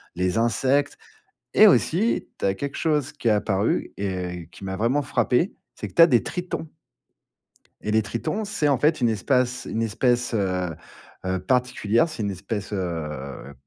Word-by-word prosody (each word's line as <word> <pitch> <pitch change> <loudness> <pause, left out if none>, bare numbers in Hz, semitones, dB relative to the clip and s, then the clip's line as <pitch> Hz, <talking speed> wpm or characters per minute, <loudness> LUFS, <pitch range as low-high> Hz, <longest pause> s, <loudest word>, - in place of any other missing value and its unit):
les 90 +4 0
insectes 130 +5 +1 0.6
et 215 - +8
aussi, 205 +2 +3
tu - - -1
as 95 - +2
quelque 140 +7 -5
chose 150 -3 0
qui 135 -5 -2
est - - +5
apparu 105 0 0
et 90 -3 -4
qui - - -11
m'a 95 0 -3
vraiment 120 +8 +1
frappé, 125 - +1 0.2
c'est - - -6
que, - - -17
tu - - +3
as 165 - +10
des 120 -8 +3
tritons 180 -2 -4 1.2
et 105 - -2
les 110 +1 +4
tritons, 155 - -3
c'est, 200 -8 0
en 140 - +3
fait, 150 +3 +2
une 120 - +4
espace 125 +3 0
une 115 - -2
espèce, 120 +2 +1
heu 90 -5 -1 0.5
heu, 95 0 0
particulière, 125 - +1
c'est 140 -8 -5
une 100 - -1
espèce, 100 +2 -5
heu, 75 -7 -5
115 Hz, 170 wpm, -24 LUFS, 95-140 Hz, 1.2 s, as